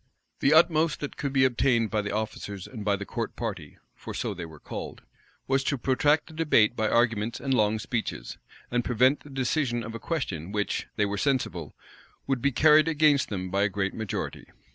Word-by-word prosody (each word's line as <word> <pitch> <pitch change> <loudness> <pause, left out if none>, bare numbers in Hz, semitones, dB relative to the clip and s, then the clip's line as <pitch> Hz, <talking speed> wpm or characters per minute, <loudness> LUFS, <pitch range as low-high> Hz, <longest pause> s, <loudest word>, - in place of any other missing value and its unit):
The 140 - +3
utmost 160 -1 +4
that 145 - -5
could 140 -2 -3
be 135 -1 +4
obtained 120 -3 +2
by 105 -1 +1
the 105 - -4
officers 100 -2 -4
and 110 -5 -8
by 100 -1 +2
the 100 0 -6
court - - -4
party, - - -5 0.2
for - - -8
so - - -2
they 85 - -7
were 80 -2 -13
called, - - -7 0.4
was 135 0 +2
to 140 - 0
protract 145 +4 +2
the 160 - -14
debate 150 -9 +3
by 110 -2 0
arguments 115 -1 +1
and 135 0 -1
long 110 -2 +2
speeches, 115 +1 -4 0.3
and 120 0 +1
prevent 130 +4 +3
the 145 - -15
decision 130 -2 -1
of 115 0 -7
a 115 - -6
question 100 - -3
which, 105 0 -2
they 105 - +2
were 100 0 -2
sensible, 135 -3 -1 0.5
would 135 -3 -1
be 140 - +2
carried 155 +4 +5
against 150 -3 +3
them 95 -3 -4
by 100 +1 +1
a 105 - +3
great 95 -1 -2
majority. 110 -3 -4
120 Hz, 200 wpm, -27 LUFS, 105-140 Hz, 0.5 s, carried